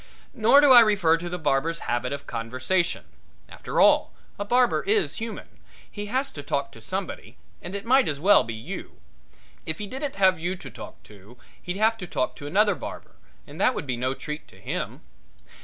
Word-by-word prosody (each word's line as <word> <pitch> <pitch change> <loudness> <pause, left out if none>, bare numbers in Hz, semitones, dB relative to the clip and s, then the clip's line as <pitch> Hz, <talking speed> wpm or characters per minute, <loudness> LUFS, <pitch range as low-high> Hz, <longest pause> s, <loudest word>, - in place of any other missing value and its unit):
Nor 260 +3 +5
do 290 -2 +6
I 245 - +11
refer 200 -8 +4
to 175 +1 -6
the 180 - -3
barber's 155 +2 0
habit 120 +1 -2
of 140 0 -5
conversation. 130 +11 -1 0.4
After - - -4
all, - - +5 0.3
a - - -1
barber 245 +3 +2
is 420 +2 +1
human 225 0 -7 0.3
he 205 0 -6
has 260 +5 -1
to - - -8
talk - - -2
to - - -14
somebody, - - -5 0.2
and 180 +3 -7
it 200 +2 -5
might 260 +3 +4
as 145 -2 -2
well 200 +6 +5
be 115 -1 -6
you. 110 - -8 0.7
If 160 0 -2
he 210 - -5
didn't 265 +6 -5
have 190 -3 +4
you 175 +3 -2
to 135 -8 -11
talk - - -11
to 105 +3 -16 0.2
he'd 180 +1 -4
have 220 +2 +2
to 180 - -6
talk 210 - -2
to 145 - -8
another 205 +6 +3
barber, - - -9 0.3
and - - -9
that 255 - +3
would 180 - -4
be 130 -3 -2
no 130 +2 -2
treat 150 +2 -7
to - - -19
him. - - -5
185 Hz, 200 wpm, -25 LUFS, 140-220 Hz, 0.7 s, I